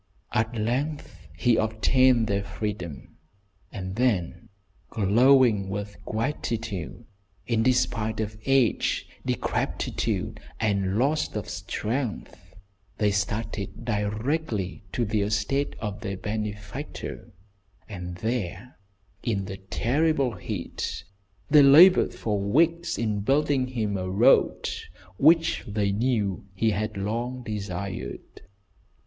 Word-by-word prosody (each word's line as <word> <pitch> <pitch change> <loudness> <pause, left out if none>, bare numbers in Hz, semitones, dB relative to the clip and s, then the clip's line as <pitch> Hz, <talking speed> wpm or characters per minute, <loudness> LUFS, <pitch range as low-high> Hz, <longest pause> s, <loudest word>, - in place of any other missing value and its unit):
At 110 +2 0
length 135 +8 -3
he 120 -3 +3
obtained 115 +2 +3
their 100 -2 0
freedom, 100 -8 -6 0.5
and 95 -2 -6
then, 90 -8 0 0.4
glowing 115 0 +4
with 100 +1 -4
gratitude, 115 - -3 0.4
in 115 -2 +1
despite 115 -3 +1
of 110 -1 -2
age, 135 -4 +2 0.2
decrepitude, - - -2 0.2
and 100 -2 +1
loss 145 +6 +1
of 105 - -3
strength, 105 +7 -4 0.4
they 105 -1 +2
started 100 +1 -3
directly 105 - -2
for 120 - 0
the 105 0 0
estate 110 +7 0
of 105 -2 -4
their 100 -3 -4
benefactor, 105 +5 -5 0.6
and 90 -4 -6
there, 110 +2 -4 0.4
in 100 -5 -1
the 95 +1 -6
terrible 135 +8 +1
heat, 100 -7 -5 0.4
they 150 0 +7
laboured 160 +7 +7
for 105 -2 -1
weeks 165 +12 +2
in 110 -3 -1
building 135 +3 +2
him 110 -5 -2
a 95 0 -3
road 95 - +4 0.5
which 160 +3 +4
they 100 -1 0
knew 105 -4 0
he 110 +3 +2
had 110 +1 -2
long 120 +5 -3
desired. 100 -3 -5
110 Hz, 105 wpm, -26 LUFS, 100-125 Hz, 0.6 s, they